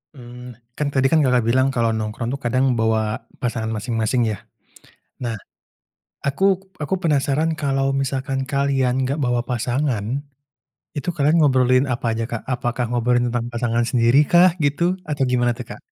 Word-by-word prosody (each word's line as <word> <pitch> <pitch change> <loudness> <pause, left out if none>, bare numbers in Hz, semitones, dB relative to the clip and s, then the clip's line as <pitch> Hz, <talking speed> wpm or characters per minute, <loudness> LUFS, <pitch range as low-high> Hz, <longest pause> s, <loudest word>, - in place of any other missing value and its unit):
Mmm, 125 -1 -11 0.2
kan 150 - 0
tadi 135 -1 +2
kan 155 -2 +4
Kakak 125 -2 +3
bilang 130 +3 +3
kalau 115 -1 +2
nongkrong 110 +2 -3
tuh 140 - -11
kadang 130 +1 +2
bawa 110 0 +2 0.4
pasangan 115 -3 -2
masing-masing, 115 +2 -1
ya. 100 - -4 0.9
Nah, 120 -2 -2 0.9
aku 140 +7 0 0.4
aku 150 - -1
penasaran 150 0 +1
kalau 135 -1 0
misalkan 135 0 -1
kalian 140 -2 +1
enggak 135 +4 -1
bawa 120 -1 +1
pasangan, 125 0 -1 0.7
itu 150 +5 -3
kalian 150 +2 +2
ngobrolin 130 -2 +4
apa 125 0 -2
aja, 115 +1 -2
Kak? 115 - -4
Apakah 120 0 -2
ngobrolin 120 0 +1
tentang 120 0 -2
pasangan 120 -1 -1
sendiri 120 +2 +4
kah 175 +1 +7
gitu 145 +3 +1 0.3
atau 145 -2 0
gimana 120 -1 +1
tuh, 125 - -7
Kak? - - -14
125 Hz, 155 wpm, -21 LUFS, 120-140 Hz, 0.9 s, kah